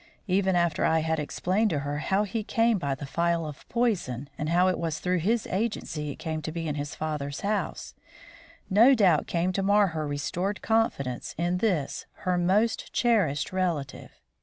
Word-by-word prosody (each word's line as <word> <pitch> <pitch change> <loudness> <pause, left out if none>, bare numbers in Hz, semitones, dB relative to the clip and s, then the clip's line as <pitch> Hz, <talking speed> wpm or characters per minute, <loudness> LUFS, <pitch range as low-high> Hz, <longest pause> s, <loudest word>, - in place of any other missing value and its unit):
Even 190 -1 +2
after 170 -3 +1
I 160 0 +3
had 160 0 0
explained 185 +8 0
to 150 -6 -1
her 145 +1 -3
how 195 +6 +1
he 215 +2 -3
came 225 0 +2
by 140 -5 -1
the 145 - -7
phial 170 +3 0
of 150 -1 -9
poison, 170 - -1
and 150 +1 -3
how 175 +2 +4
it 185 - +1
was 165 -2 -2
through 180 +2 0
his 220 +7 +1
agency 185 -7 -2
it 140 - -5
came 160 -1 -4
to 155 - -4
be 165 0 -4
in 150 - -1
his 145 0 -4
father's 150 -2 -4
house, 205 +1 -2 0.7
no 230 +8 +6
doubt 185 - +3
came 175 +2 0
to 195 - 0
mar 200 0 +4
her 155 -2 -3
restored 175 +8 -2
confidence 140 - 0
in 175 +2 0
this 180 -10 -1 0.2
her 180 -1 +2
most 190 +6 +1
cherished 195 - +1
relative. 170 -8 -3
175 Hz, 185 wpm, -27 LUFS, 150-200 Hz, 0.7 s, no